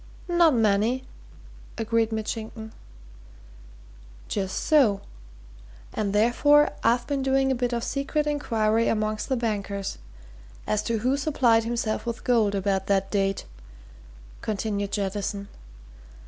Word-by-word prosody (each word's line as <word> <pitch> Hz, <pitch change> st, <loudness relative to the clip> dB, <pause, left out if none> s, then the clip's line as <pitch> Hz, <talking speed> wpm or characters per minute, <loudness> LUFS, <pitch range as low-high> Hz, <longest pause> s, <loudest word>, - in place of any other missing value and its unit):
"Not 345 Hz, -4 st, +4 dB
many," 220 Hz, +3 st, +2 dB, 0.7 s
agreed 225 Hz, 0 st, +1 dB
Mitchington. 220 Hz, 0 st, -5 dB, 1.5 s
"Just 190 Hz, -2 st, -2 dB
so 245 Hz, -11 st, +3 dB, 0.9 s
and 210 Hz, -2 st, -1 dB
therefore 245 Hz, +8 st, +4 dB
I've 240 Hz, +1 st, +2 dB
been 280 Hz, -2 st, -1 dB
doing 270 Hz, 0 st, +2 dB
a 255 Hz, -1 st, -2 dB
bit 245 Hz, 0 st, +1 dB
of 235 Hz, -1 st, -2 dB
secret 295 Hz, +2 st, -1 dB
inquiry 230 Hz, -6 st, +1 dB
amongst 215 Hz, 0 st, -1 dB
the 260 Hz, -, +1 dB
bankers, 200 Hz, -4 st, -3 dB, 0.7 s
as 215 Hz, 0 st, 0 dB
to 230 Hz, -, +1 dB
who 255 Hz, +5 st, +1 dB
supplied 250 Hz, -6 st, +2 dB
himself 230 Hz, -1 st, -2 dB
with 235 Hz, -1 st, -4 dB
gold 220 Hz, -5 st, +2 dB
about 195 Hz, -1 st, 0 dB
that 195 Hz, -1 st, +1 dB
date," 195 Hz, -1 st, 0 dB, 1.0 s
continued 205 Hz, -1 st, -2 dB
Jettison. 200 Hz, 0 st, -3 dB
225 Hz, 115 wpm, -25 LUFS, 205-255 Hz, 1.5 s, Not